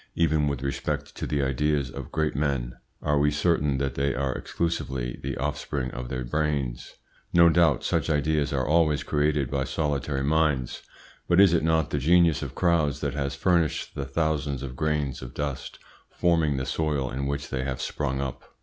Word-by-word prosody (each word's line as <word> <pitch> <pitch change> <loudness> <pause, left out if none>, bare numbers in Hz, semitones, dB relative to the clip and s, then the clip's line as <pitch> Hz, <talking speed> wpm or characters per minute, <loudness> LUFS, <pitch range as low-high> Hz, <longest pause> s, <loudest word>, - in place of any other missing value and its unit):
Even 80 -3 +2
with 70 -2 -2
respect 70 - -3
to - - -4
the 70 -1 0
ideas 70 0 0
of 70 -1 -8
great 80 -2 0
men 70 -4 -1 0.3
are 75 -1 +2
we 75 +1 +4
certain 75 -2 +1
that 70 -1 -1
they 70 0 0
are 65 0 -1
exclusively 65 -6 -3
the - - -4
offspring 70 -1 -2
of 60 0 -6
their 65 -1 -3
brains? 70 -3 -2 0.4
No 85 -1 +7
doubt 80 -6 +3
such - - 0
ideas 75 -1 +1
are - - 0
always 75 -2 +3
created 75 -3 0
by 70 -1 0
solitary 70 -2 -1
minds, 75 -4 +1 0.5
but 85 +1 +4
is 100 -3 +7
it 85 - +3
not 80 -2 +2
the 75 - 0
genius 85 +1 +4
of - - -6
crowds 85 -5 +2
that 70 -2 -1
has 70 -1 -2
furnished 85 +2 +1
the 70 - -4
thousands 75 -1 -1
of 65 -2 -6
grains 75 -3 -1
of - - -9
dust 70 -3 -4 0.3
forming 80 -5 +1
the 65 - -2
soil 70 -1 -1
in 70 +2 -2
which 70 0 -3
they 65 -1 -1
have 65 -1 -3
sprung 70 -2 -2
up? 70 -2 -6
70 Hz, 185 wpm, -26 LUFS, 65-80 Hz, 0.5 s, No